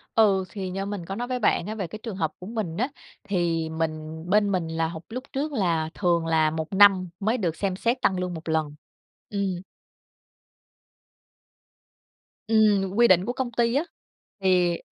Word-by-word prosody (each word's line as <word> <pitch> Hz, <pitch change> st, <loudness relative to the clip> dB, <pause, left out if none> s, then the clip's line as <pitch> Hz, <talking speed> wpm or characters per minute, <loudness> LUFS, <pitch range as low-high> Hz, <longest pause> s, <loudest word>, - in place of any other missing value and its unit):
Ừ, 195 Hz, -4 st, +4 dB
thì 190 Hz, -3 st, -5 dB
như 195 Hz, +2 st, -3 dB
mình 200 Hz, -4 st, -5 dB
có 195 Hz, -, -5 dB
nói 240 Hz, +3 st, -3 dB
với 250 Hz, 0 st, -2 dB
bạn 205 Hz, -4 st, +2 dB
á 215 Hz, -, -4 dB
về 195 Hz, -5 st, -3 dB
cái 215 Hz, +6 st, -8 dB
trường 225 Hz, -5 st, -5 dB
hợp 160 Hz, -4 st, -1 dB
của 180 Hz, -, -9 dB
mình 210 Hz, -7 st, -3 dB
á, 250 Hz, +5 st, 0 dB, 0.3 s
thì 170 Hz, -5 st, 0 dB
mình 160 Hz, 0 st, -4 dB
bên 205 Hz, 0 st, +3 dB
mình 180 Hz, -4 st, 0 dB
là 160 Hz, 0 st, -1 dB
họp 160 Hz, 0 st, -7 dB
lúc 255 Hz, +3 st, -5 dB
trước 290 Hz, +3 st, -1 dB
là 170 Hz, -, 0 dB
thường 170 Hz, -3 st, +1 dB
là 160 Hz, -1 st, +3 dB
1 160 Hz, +3 st, -4 dB
năm 190 Hz, -2 st, +6 dB
mới 220 Hz, +5 st, +1 dB
được 175 Hz, -8 st, -1 dB
xem 195 Hz, -1 st, -1 dB
xét 235 Hz, +6 st, 0 dB
tăng 190 Hz, -1 st, +2 dB
lương 180 Hz, -1 st, -2 dB
1 165 Hz, -1 st, -7 dB
lần. 155 Hz, -2 st, 0 dB, 0.5 s
Ừm. 195 Hz, -3 st, -2 dB, 2.9 s
Ừm, 210 Hz, -3 st, +3 dB
quy 235 Hz, +2 st, +6 dB
định 185 Hz, -2 st, +5 dB
của 245 Hz, -, -2 dB
công 255 Hz, -1 st, -3 dB
ty 235 Hz, +1 st, +1 dB
á, 285 Hz, -, +3 dB, 0.6 s
thì 180 Hz, -2 st, +3 dB
190 Hz, 185 wpm, -25 LUFS, 165-215 Hz, 2.9 s, năm